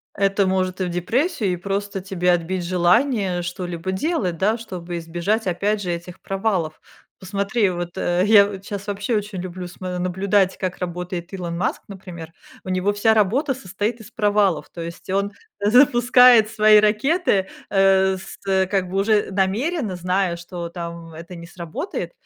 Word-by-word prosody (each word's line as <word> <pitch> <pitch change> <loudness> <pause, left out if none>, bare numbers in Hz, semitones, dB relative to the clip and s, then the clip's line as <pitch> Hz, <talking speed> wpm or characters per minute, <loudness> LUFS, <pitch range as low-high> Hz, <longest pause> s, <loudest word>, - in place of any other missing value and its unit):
Это 195 0 +2
может 185 0 -1
и - - +1
в - - -2
депрессию, 220 - 0
и - - -1
просто 200 +2 -3
тебе 180 -1 0
отбить 175 +1 -1
желание 185 +2 +2
что-либо 175 +1 -4
делать, 190 - -1
да, 215 +6 +1
чтобы 180 -6 -6
избежать 175 +7 -2
опять 200 +4 0
же 180 - -3
этих 175 +1 -6
провалов. 190 -5 -2 0.4
Посмотри, 200 +3 0
вот, 175 -1 -5
э, 175 +1 +1
я 205 -2 +7
вот 195 -1 -8
щас, 200 -1 -6
вообще 205 +3 -1
очень 205 -2 -3
люблю 180 0 -6
смо 180 0 -6
наблюдать, 190 +2 +1
как 185 -1 -4
работает 180 0 -5
Илон 175 -3 -4
Маск, 185 - -1
например. 180 -4 -9 0.3
У - - -9
него 185 +2 +1
вся 205 +2 +3
работа 235 +7 +2
состоит 210 0 -3
из 220 - -12
провалов. 205 -7 +1
То 170 - -9
есть 170 +3 -8
он 200 +2 0 0.3
запускает 245 0 +6
свои 215 -1 +5
ракеты, 215 - +2 0.2
э, 190 -1 +4
с, 185 - -11
э, 190 -1 +3
как 185 -1 -1
бы 190 +2 -2
уже 205 +1 +2
намеренно 205 - 0
зная, 180 0 0
что 170 0 -7
там, 170 -1 -7
это 170 +3 -10
не 170 -1 -9
сработает, 170 - -5
190 Hz, 165 wpm, -22 LUFS, 180-210 Hz, 0.4 s, я